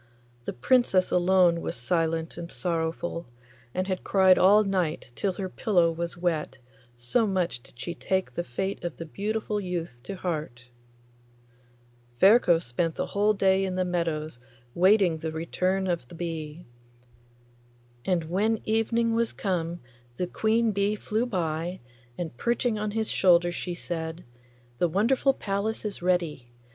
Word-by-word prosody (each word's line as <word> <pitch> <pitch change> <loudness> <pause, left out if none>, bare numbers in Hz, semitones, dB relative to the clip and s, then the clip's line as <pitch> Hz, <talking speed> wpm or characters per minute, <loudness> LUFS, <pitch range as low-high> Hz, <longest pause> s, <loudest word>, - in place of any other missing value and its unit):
The - - -3
Princess 195 - +3
alone 180 -1 +4
was - - -4
silent 165 +5 -1
and 170 0 -7
sorrowful, 170 0 -2 0.4
and 185 +5 -1
had 185 -1 -3
cried 190 -2 +5
all 205 +3 +6
night 180 -9 -1
till 195 -2 0
her 190 +1 -4
pillow 180 -3 +2
was 170 +1 -4
wet, 165 -6 -1 0.4
so 120 - +1
much 180 -10 -1
did 120 - -19
she 170 - -4
take 190 -9 -1
the 175 - -2
fate 190 +9 -4
of 175 -2 -4
the 165 - -6
beautiful 210 +4 -2
youth 170 -9 -4
to 195 - -5
heart. 150 -9 -4 1.5
Ferko 195 -4 +6
spent 165 +3 -2
the - - -1
whole 205 +1 +2
day 195 -1 +3
in 190 -1 -2
the 185 0 +1
meadows 160 -6 -2 0.3
waiting 185 -2 +4
the 160 0 -3
return 185 +4 -1
of 170 -9 -2
the 170 - -12
bee. 165 -1 -5 1.4
And 180 -3 +1
when 205 +7 0
evening 230 +1 +1
was 230 0 +1
come 175 -3 -2 0.4
the 180 - 0
queen 220 +5 +1
bee 200 +1 +1
flew 220 +3 -1
by, 175 -3 -2 0.4
and 165 -8 -4
perching 235 - 0
on 210 0 -1
his 220 +1 -2
shoulder 175 -2 +4
she 175 0 -4
said, 165 0 -5 0.6
'The 175 - +3
wonderful 250 - +2
palace 205 +3 -2
is 205 -4 -4
ready. 170 -8 0
180 Hz, 150 wpm, -27 LUFS, 165-200 Hz, 1.5 s, all